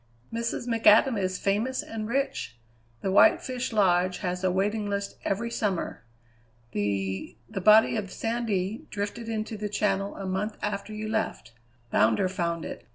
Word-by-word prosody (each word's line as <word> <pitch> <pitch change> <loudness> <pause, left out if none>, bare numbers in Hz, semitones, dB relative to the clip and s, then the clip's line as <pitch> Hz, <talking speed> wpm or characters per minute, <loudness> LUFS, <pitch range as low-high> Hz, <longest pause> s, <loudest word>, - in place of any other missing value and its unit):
"Mrs. 230 +1 -2
McAdam 230 +1 +5
is 185 -2 -1
famous 220 +7 0
and 220 -1 -5
rich. 235 - -2 0.4
The 195 - -1
White 190 - +6
Fish 255 -1 -4
Lodge 185 -4 +3
has 180 0 -2
a 185 - +3
waiting 205 +3 0
list 200 0 -3
every 235 +4 -1
summer. 195 - -2 0.7
The 100 -1 -2
the 195 - -5
body 215 +4 +6
of 195 -3 -4
Sandy 225 -3 -2
drifted 210 +3 -4
into 220 0 -3
the 210 0 -3
Channel 200 -1 0
a 195 - -6
month 195 +3 -2
after 210 0 -3
you 215 0 -4
left. 220 0 -2 0.4
Bounder 110 - +3
found 170 -3 -2
it. - - -8
205 Hz, 155 wpm, -27 LUFS, 185-220 Hz, 0.7 s, White